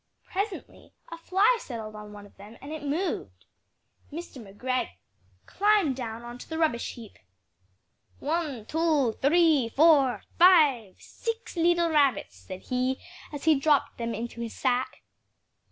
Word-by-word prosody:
Presently 395 0 -5 0.2
a 335 - -8
fly 400 +8 +2
settled 225 - -7
on 210 0 -10
one 205 -1 -11
of 205 - -19
them 210 +4 -13
and 280 +3 -10
it 315 -1 -6
moved. 305 +6 -3 0.7
Mr. 310 -4 -8
McGregor 235 +4 -3 0.6
climbed 405 -8 +2
down 230 -2 -6
on 240 +1 -9
to - - -11
the 320 - -4
rubbish 310 -8 0
heap 230 -3 -13 1.0
"One, 295 -7 -3
two, 305 -5 +1
three, 300 -4 +4
four! 285 -2 +4 0.2
five! 295 - +5
six 455 -2 -6
leetle 340 0 +2
rabbits!" 280 -8 +2
said 185 -1 -10
he 255 +1 -1 0.3
as 290 -2 -7
he 320 - +5
dropped 290 -1 +1
them 230 0 -3
into 235 0 -6
his 230 -1 -6
sack. 255 -1 -1
280 Hz, 140 wpm, -27 LUFS, 235-330 Hz, 1.0 s, five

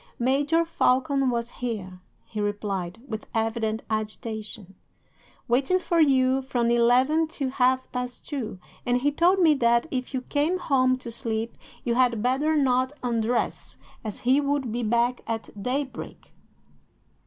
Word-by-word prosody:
"'"Major 285 +7 +2
Falcon 275 -3 +2
was 235 -1 -2
here," 200 -7 -5 0.3
he 215 - -5
replied, 205 -1 -3
with 220 -2 -6
evident 225 0 -1
agitation, 215 -2 -5 0.7
"waiting 265 +9 +2
for 345 -2 0
you 265 -3 +4
from 245 -3 0
eleven 255 +7 +4
till 275 -4 -3
half 260 0 +2
past 250 -1 -5
two, 250 -9 -4 0.3
and 245 0 +1
he 290 +2 +2
told 345 +6 +3
me 325 -4 +6
that, 235 -2 +3
if 255 -2 -3
you 255 - -1
came 300 +7 0
home 255 -7 +2
to 245 -2 -7
sleep, 225 -1 -3 0.3
you 240 - 0
had 240 -3 +2
better 275 +5 +2
not 260 -2 +2
undress, 235 0 -1 0.3
as 215 -3 -5
he 260 +4 +3
would 280 -4 -1
be 240 +2 -2
back 235 +2 +1
at 225 -1 -4
daybreak." 265 +4 -4
250 Hz, 145 wpm, -26 LUFS, 230-275 Hz, 0.7 s, me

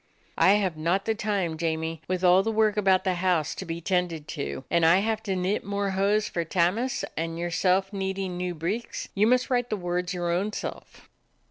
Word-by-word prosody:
"I 190 - +6
have 195 -5 +1
not 175 +5 0
the 225 - +1
time, 200 -6 -1
Jamie, 160 -1 -2
with 185 0 -2
all 180 +1 +6
the 225 +3 -1
work 220 -1 +2
about 190 -3 +3
the 190 -2 +1
house 175 -4 +1
to - - -7
be 165 0 -5
tended 170 -4 -1
to, 145 -3 -4
and 170 -1 +3
I 165 +2 +6
have 220 +2 0
to 195 -4 -2
knit 185 +3 -1
more 200 0 -2
hose 200 +2 +1
for 170 - -2
Tammas, 185 +10 0
and 165 +1 -3
your 175 +1 -3
self 190 +3 +1
needin' 190 -1 -3
new 180 0 -3
breeks. 190 +9 -4
You 205 +2 +3
must 255 +2 +2
write 245 -1 +1
the 215 - -1
words 175 -1 -2
your 175 -1 -2
own 195 +5 -1
self." - - -7
185 Hz, 210 wpm, -26 LUFS, 170-205 Hz, -, I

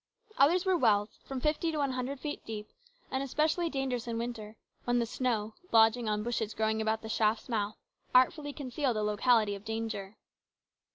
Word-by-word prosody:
Others 345 +7 +5
were 380 -1 +3
wells, 215 -8 +2
from 270 -1 -4
fifty 310 +4 0
to 310 - -3
one 280 -2 +1
hundred 255 +2 -3
feet 295 +2 -5
deep, 215 -1 -6 0.4
and 265 - 0
especially 310 +5 +1
dangerous 265 -4 -2
in 230 -1 -2
winter, 225 -2 -5 0.3
when 245 0 +2
the 235 - +2
snow, 225 -3 -1 0.2
lodging 225 0 +5
on 210 0 0
bushes 225 -2 -2
growing 220 0 +1
about 220 0 0
the - - -6
shaft's 220 0 +1
mouth, 215 -3 -2 0.4
artfully 290 +4 +4
concealed 270 -2 -2
the 215 - 0
locality 210 0 +3
of 200 0 -7
danger. 220 -2 -4
235 Hz, 175 wpm, -31 LUFS, 220-270 Hz, 0.4 s, Others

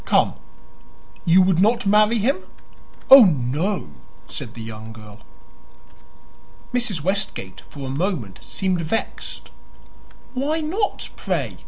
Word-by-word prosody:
"Come; - - +2 0.9
you 180 +2 +6
would 185 -2 +2
not 230 +4 +3
marry 210 +3 +4
him?" 265 - +1 0.7
"Oh, 270 -2 +12
no," 150 - -1 0.4
said - - -7
the 115 - -8
young 110 0 -9
girl. 105 -2 -13 1.5
Mrs. 235 -9 0
Westgate 190 - -2
for 140 -2 -8
a 130 - -4
moment 140 - -3
seemed 185 -3 -2
vexed. 170 +8 -4 0.8
"Why 285 +5 -1
not, 370 +7 -2
pray?" - - -3
190 Hz, 115 wpm, -22 LUFS, -, 1.5 s, Oh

